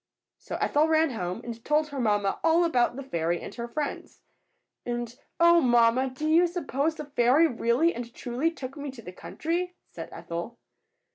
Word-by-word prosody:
So - - -6
Ethel 300 +2 +2
ran 320 -2 +3
home 185 -2 -4
and 230 -1 -7
told 305 +1 +1
her 285 -2 -5
mamma 205 -4 +1
all 330 +1 +4
about 245 -7 +2
the 275 - -6
fairy 170 -7 -1
and - - -8
her 235 -1 -5
friends. 290 +4 -5 0.6
And, 240 -1 -4 0.2
"Oh, 340 0 +6
mamma! 240 0 +4
do 265 +4 -4
you 335 +3 +5
suppose 320 -3 -1
the 300 - -6
fairy 275 +2 +4
really 250 +4 +2
and 235 0 -6
truly 250 +6 -1
took 270 -5 -8
me 290 -1 -5
to 255 -3 -10
the 180 - -9
country?" 350 - -3 0.2
said - - -8
Ethel. 170 +8 -6
260 Hz, 180 wpm, -27 LUFS, 235-315 Hz, 0.6 s, Oh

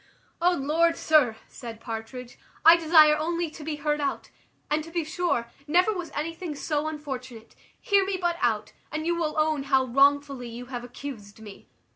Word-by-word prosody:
"O 355 +1 +4
Lord, 330 +3 +1
sir," 295 -8 +3
said 230 -4 -9
Partridge, 230 +2 -7 0.3
"I 330 +1 +10
desire 315 -2 +6
only 335 +1 -2
to 310 - -10
be 305 0 -3
heard 295 0 -1
out; 280 - -3 0.4
and 305 +1 0
to 330 - -11
be 335 0 -2
sure, 310 -7 -2 0.2
never 360 +8 +3
was 355 -4 -5
anything 330 +1 -4
so 300 +1 -2
unfortunate: 260 -7 -7 0.2
hear 400 -1 +3
me 385 -1 -2
but 345 -1 0
out, 215 -3 0 0.2
and 310 +1 -3
you 345 +1 +1
will 320 -3 -2
own 310 -1 +1
how 265 -1 +2
wrongfully 275 0 +2
you 240 +2 -8
have 245 -1 -6
accused 240 -5 -9
me. 210 -2 -12
300 Hz, 175 wpm, -26 LUFS, 250-330 Hz, 0.4 s, I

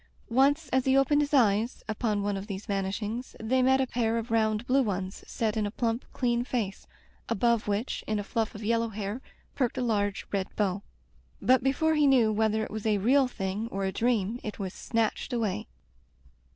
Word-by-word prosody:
Once 280 +5 +3
as 260 0 +1
he 265 0 +4
opened 290 +2 +4
his 290 0 -1
eyes 230 -4 +2
upon 215 -2 -1
one 205 0 0
of 195 +1 -5
these 200 -1 -6
vanish 195 +1 -2
ings, 230 +5 -5
they 255 +4 +1
met 265 +1 +4
a 265 - +2
pair 230 -2 0
of 230 0 -4
round 220 0 +1
blue 265 +2 +3
ones 195 -4 -3
set 220 -2 -1
in 215 -2 0
a - - -2
plump 230 +2 -2
clean 240 -2 0
face, 225 -6 -3 0.4
above 235 +1 +1
which, 205 +4 -2
in 215 - 0
a 205 - -2
fluflF 220 +1 -2
of 210 - -7
yellow 230 +1 +1
hair, 210 +3 -4 0.3
perked 255 -2 -1
a - - 0
large 205 -4 0
red 195 -1 -1
bow; 200 -2 0 0.6
but 260 0 +4
before 315 +4 +2
he 300 -2 +4
knew 245 -5 +5
whether 220 0 +1
it - - -6
was 220 0 -3
a 210 -1 +3
real 260 +7 +4
thing 205 -1 -3
or 195 -3 -3
a 190 - 0
dream 230 0 0
it 210 - -5
was 190 -3 -4
snatched 225 +2 -1
away. 220 - -1
225 Hz, 205 wpm, -28 LUFS, 205-250 Hz, 0.6 s, knew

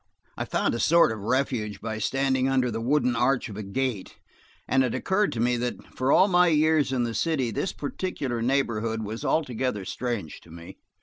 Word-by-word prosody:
I - - -3
found - - 0
a 115 - -2
sort 170 -3 +4
of 110 - -5
refuge 110 -2 -1
by 110 0 -4
standing 135 +3 +1
under 130 -2 +1
the 115 +1 -3
wooden 125 0 +1
arch 125 +2 +1
of 105 - -8
a 105 - -5
gate, 105 0 -3 0.5
and 130 0 +3
it 125 - -1
occurred 200 +2 +1
to 115 - -4
me 120 +1 +2
that, 120 0 -5
for 130 +2 +1
all 190 - +6
my 180 -2 +4
years 155 -3 +3
in 125 -2 0
the 115 -1 -2
city, 130 0 0
this 185 - -2
particular 140 -6 -4
neighborhood 115 -3 0
was 110 +2 -6
altogether 125 -8 -1
strange 115 -7 -4
to - - -19
me. 85 +1 -12
125 Hz, 195 wpm, -26 LUFS, 110-140 Hz, 0.5 s, all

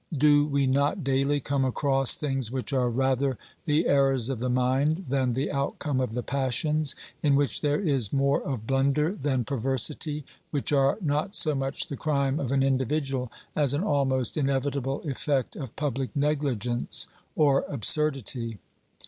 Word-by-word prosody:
Do 145 +1 +5
we 140 -2 +1
not 140 +2 +1
daily 135 +2 +1
come 140 0 -1
across 135 0 +3
things 135 -5 -1
which 130 +2 -4
are 125 -2 +2
rather 130 +1 +1 0.3
the 155 +1 +2
errors 135 -3 +3
of 130 -4 -2
the 125 +2 -1
mind 135 +8 +1
than 130 -2 +1
the 135 +4 -1
outcome 140 0 -1
of 125 -3 -2
the 125 - -2
passions, 140 +3 0 0.3
in 145 -2 +3
which 145 0 0
there 145 -1 +1
is 140 - 0
more 140 0 +2
of 125 -6 -4
blunder 140 +5 +2
than 135 -8 -1
perversity, 140 +4 -2 0.2
which 145 0 -1
are 135 +2 +3
not 155 +5 -1
so 155 -6 +3
much 135 0 -2
the 140 - -6
crime 140 -2 0
of 130 -3 -2
an 135 -1 +2
individual 135 -1 0 0.2
as 145 -2 +2
an 155 - -1
almost 135 - +1
inevitable 135 -1 -1
effect 140 -1 -1
of 135 -6 -7
public 135 -3 -2
negligence 140 -5 0 0.3
or 140 -3 +3
absurdity? 130 -4 0
135 Hz, 155 wpm, -27 LUFS, 130-145 Hz, 0.3 s, Do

